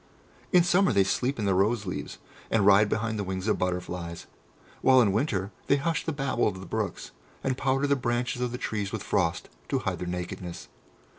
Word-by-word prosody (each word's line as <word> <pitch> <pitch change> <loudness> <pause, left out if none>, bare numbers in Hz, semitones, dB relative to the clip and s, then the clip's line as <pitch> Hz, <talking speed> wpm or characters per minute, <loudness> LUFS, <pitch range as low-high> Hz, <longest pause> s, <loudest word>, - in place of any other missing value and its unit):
In 180 -4 +6
summer 180 +2 +3
they 100 - +4
sleep 125 +7 0
in 110 - -2
the 100 - +3
roseleaves, 100 0 -1 0.3
and 105 -3 +2
ride 100 +1 +6
behind 110 -1 -1
the - - -1
wings 95 +1 -4
of 105 - +1
butterflies, 90 -2 -3 0.6
while 130 -1 +6
in 110 -5 +4
winter 100 -3 0 0.2
they 140 - +5
hush 160 +3 -1
the 160 - 0
babble 140 -4 0
of 95 -3 -3
the 95 - -8
brooks, - - -3 0.3
and 130 -1 0
powder 135 +1 +1
the 140 0 +3
branches 125 -1 -1
of 125 -1 -1
the 125 - -4
trees 105 -5 -3
with - - -4
frost - - 0 0.2
to - - +1
hide - - -2
their 90 - -4
nakedness. 90 0 -5
110 Hz, 200 wpm, -27 LUFS, 95-130 Hz, 0.6 s, In